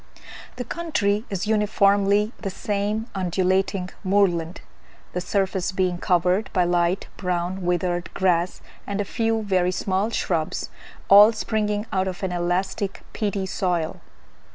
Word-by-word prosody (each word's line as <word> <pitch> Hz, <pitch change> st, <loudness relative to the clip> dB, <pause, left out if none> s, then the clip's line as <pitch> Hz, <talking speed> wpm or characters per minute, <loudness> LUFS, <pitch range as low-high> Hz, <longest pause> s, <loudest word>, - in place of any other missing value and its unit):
The 250 Hz, -, -4 dB
country 235 Hz, -8 st, -1 dB
is 195 Hz, 0 st, -2 dB
uniformly 205 Hz, -1 st, +3 dB
the 200 Hz, -, -3 dB
same 205 Hz, +3 st, -2 dB
undulating 185 Hz, 0 st, 0 dB
moorland; 185 Hz, -4 st, +1 dB, 0.5 s
the 180 Hz, -, -2 dB
surface 190 Hz, 0 st, 0 dB
being 185 Hz, -2 st, 0 dB
covered 180 Hz, +4 st, +1 dB
by 185 Hz, -, +3 dB
light 175 Hz, +1 st, +1 dB
brown 180 Hz, 0 st, -2 dB
withered 175 Hz, 0 st, -1 dB
grass 180 Hz, -2 st, +1 dB, 0.3 s
and 200 Hz, 0 st, -2 dB
a 205 Hz, -, 0 dB
few 225 Hz, +2 st, 0 dB
very 185 Hz, -3 st, +1 dB
small 190 Hz, +3 st, 0 dB
shrubs, 165 Hz, -8 st, -2 dB, 0.4 s
all 205 Hz, +2 st, +9 dB
springing 210 Hz, -1 st, -1 dB
out 190 Hz, 0 st, +1 dB
of 185 Hz, 0 st, -5 dB
an 190 Hz, -, -1 dB
elastic 180 Hz, +3 st, -2 dB
peaty 200 Hz, -2 st, -1 dB
soil. 175 Hz, -4 st, -2 dB
190 Hz, 130 wpm, -24 LUFS, 180-205 Hz, 0.5 s, all